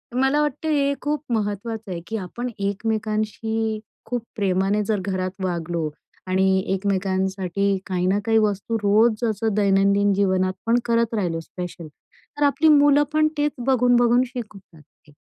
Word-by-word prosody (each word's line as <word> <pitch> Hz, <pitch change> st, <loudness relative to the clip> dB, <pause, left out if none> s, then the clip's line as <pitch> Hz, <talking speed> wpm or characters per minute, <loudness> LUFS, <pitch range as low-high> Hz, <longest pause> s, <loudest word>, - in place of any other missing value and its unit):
मला 265 Hz, +3 st, +2 dB
वाटत 295 Hz, +1 st, -2 dB
हे 280 Hz, -2 st, +2 dB
खूप 295 Hz, 0 st, -1 dB
महत्वाचं 215 Hz, 0 st, -3 dB
आहे, 170 Hz, -, -3 dB
की 225 Hz, -, -3 dB
आपण 235 Hz, +6 st, -5 dB
एकमेकांशी 215 Hz, +1 st, -2 dB, 0.3 s
खूप 245 Hz, -2 st, -2 dB
प्रेमाने 195 Hz, 0 st, +1 dB
जर 210 Hz, -1 st, 0 dB
घरात 185 Hz, -1 st, -2 dB
वागलो 170 Hz, -3 st, -2 dB, 0.4 s
आणि 190 Hz, +1 st, +2 dB, 0.3 s
एकमेकांसाठी 190 Hz, 0 st, 0 dB
काही 180 Hz, -1 st, -1 dB
ना 200 Hz, +2 st, +2 dB
काही 225 Hz, 0 st, +3 dB
वस्तू 215 Hz, +1 st, 0 dB
रोज 215 Hz, +3 st, +3 dB
असं 220 Hz, 0 st, -1 dB
दैनंदिन 200 Hz, 0 st, +3 dB
जीवनात 185 Hz, -1 st, +1 dB
पण 235 Hz, +1 st, +3 dB
करत 230 Hz, -1 st, +1 dB
राहिलो 175 Hz, -5 st, -1 dB
स्पेशल 175 Hz, -1 st, -8 dB
तर 290 Hz, -, -9 dB
आपली 290 Hz, +3 st, +3 dB
मुलं 290 Hz, 0 st, +6 dB
पण 310 Hz, 0 st, +4 dB
तेच 295 Hz, 0 st, +1 dB, 0.2 s
बघून-बघून 245 Hz, -1 st, +4 dB
शिकून 215 Hz, -5 st, -7 dB, 0.2 s
जातील. 150 Hz, -1 st, -22 dB
210 Hz, 140 wpm, -23 LUFS, 190-235 Hz, 0.4 s, मुलं